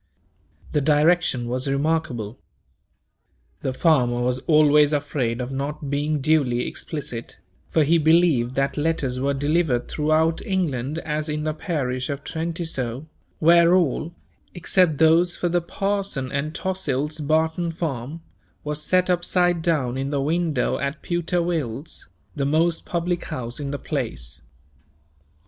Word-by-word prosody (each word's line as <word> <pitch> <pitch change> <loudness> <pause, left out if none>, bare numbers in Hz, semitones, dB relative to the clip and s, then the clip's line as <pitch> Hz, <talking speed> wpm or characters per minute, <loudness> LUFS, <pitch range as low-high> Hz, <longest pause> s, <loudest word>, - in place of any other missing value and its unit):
The 150 - +1
direction 150 -3 +2
was 125 +3 -2
remarkable. 140 -6 -1 1.2
The 130 - -1
farmer 130 -4 +2
was 125 +1 0
always 150 -1 +5
afraid 135 -5 -1
of 125 +1 -4
not 140 +1 -4
being 145 +1 0
duly 130 -5 +2
explicit, 125 -7 -6 0.3
for 160 - +3
he 165 +3 +3
believed 155 -6 +3
that 135 +1 0
letters 145 -5 0
were 140 +1 0
delivered 145 -3 +1
throughout 155 +2 +1
England 155 -7 -1
as 155 0 -2
in 150 0 -2
the 155 0 -1
parish 130 -6 -2
of 140 -1 -4
Trentisoe; 160 -6 -3 0.3
where 170 +2 +5
all, 170 -1 0 0.4
except 175 -3 +2
those 165 +3 +4
for 175 - 0
the 175 +1 +1
parson 195 -7 -2
and 150 +3 -2
Tossil's 155 -5 -2
Barton 160 +3 +1
farm, 160 -1 -4 0.4
were 150 - -2
set 180 +5 +1
upside 175 -1 +1
down 145 -7 0
in 135 +1 -2
the 145 -1 -1
window 160 +2 0
at 140 +2 -3
Pewter 175 0 0
Will's, 155 -4 -4 0.3
the 140 -2 -1
most 165 +3 +1
public 175 0 -1
house 120 +2 -5
in 145 -1 -4
the 145 - -3
place. 60 - -4
150 Hz, 135 wpm, -23 LUFS, 135-165 Hz, 1.2 s, always